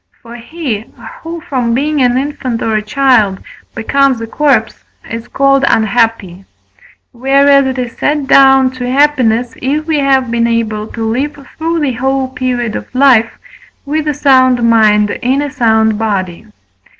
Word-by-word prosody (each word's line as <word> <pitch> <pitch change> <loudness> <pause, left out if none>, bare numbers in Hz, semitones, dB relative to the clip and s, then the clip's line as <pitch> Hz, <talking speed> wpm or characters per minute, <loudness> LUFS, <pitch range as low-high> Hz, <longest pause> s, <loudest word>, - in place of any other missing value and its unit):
For 235 0 -12
he, 240 -3 -5 0.4
who, 330 0 -7
from 245 -6 -2
being 295 +2 -1
an 250 0 +2
infant 260 -4 -3
or 220 -1 -1
a 215 - 0
child, 215 -3 +1 0.4
becomes 265 +2 +1
a 230 - -5
corpse, 290 +5 0 0.2
is 230 0 -7
called 275 0 +1
unhappy; 220 -4 0 0.7
whereas 275 +2 +3
it 260 0 -3
is 245 -2 -4
set 295 -1 0
down 270 -1 +4
to 250 -1 -5
happiness, 255 -4 +1
if 295 +4 -2
we 315 -2 0
have 265 -3 +1
been 235 0 +1
able 220 -2 -2
to 225 0 -6
live 265 +7 -2 0.2
through 330 +1 -2
the 275 -4 -1
whole 265 +2 -1
period 250 -4 -3
of - - -8
life 255 -4 +3 0.5
with 305 +2 -2
a 300 - 0
sound 255 -4 +3
mind 210 -2 +3
in 260 +3 0
a 290 -1 -3
sound 220 -3 +1
body. 195 -3 -3
255 Hz, 155 wpm, -12 LUFS, 225-275 Hz, 0.7 s, down